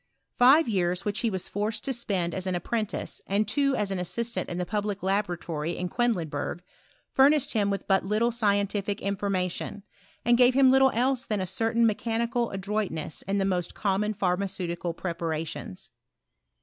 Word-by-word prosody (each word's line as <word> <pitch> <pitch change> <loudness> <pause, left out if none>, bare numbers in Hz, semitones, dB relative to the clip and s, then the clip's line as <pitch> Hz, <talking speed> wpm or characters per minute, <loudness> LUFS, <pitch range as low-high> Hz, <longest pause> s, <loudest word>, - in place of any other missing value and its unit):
Five 265 +5 +6
years 180 -4 0
which 205 +1 -1
he 230 - +1
was 190 -3 -4
forced 215 +2 -2
to 270 - -1
spend 190 -8 -1
as 190 0 -4
an 185 - 0
apprentice, 215 +4 -3
and 200 +2 +1
two 275 +5 +2
as 205 -4 -1
an 190 - -1
assistant 205 +2 -2
in 175 - -4
the 180 - -1
public 205 +1 -2
laboratory 175 -5 -1
in 180 0 -3
Quedlinburg, 175 -8 -1 0.5
furnished 280 +1 +4
him 205 -3 +2
with 200 0 -3
but 190 -1 +3
little 215 +5 +1
scientific 205 -2 0
information, 195 0 -2 0.4
and 240 +1 +4
gave 250 0 +6
him 265 -1 +6
little 265 0 +6
else 255 +2 +1
than 210 -2 0
a 185 - -1
certain 225 +5 +1
mechanical 230 +2 0
adroitness 195 -5 -3
in 200 +1 0
the 195 - +1
most 180 -3 -1
common 210 +1 0
pharmaceutical 180 -3 -2
preparations. 165 - -4
200 Hz, 160 wpm, -27 LUFS, 180-230 Hz, 0.5 s, Five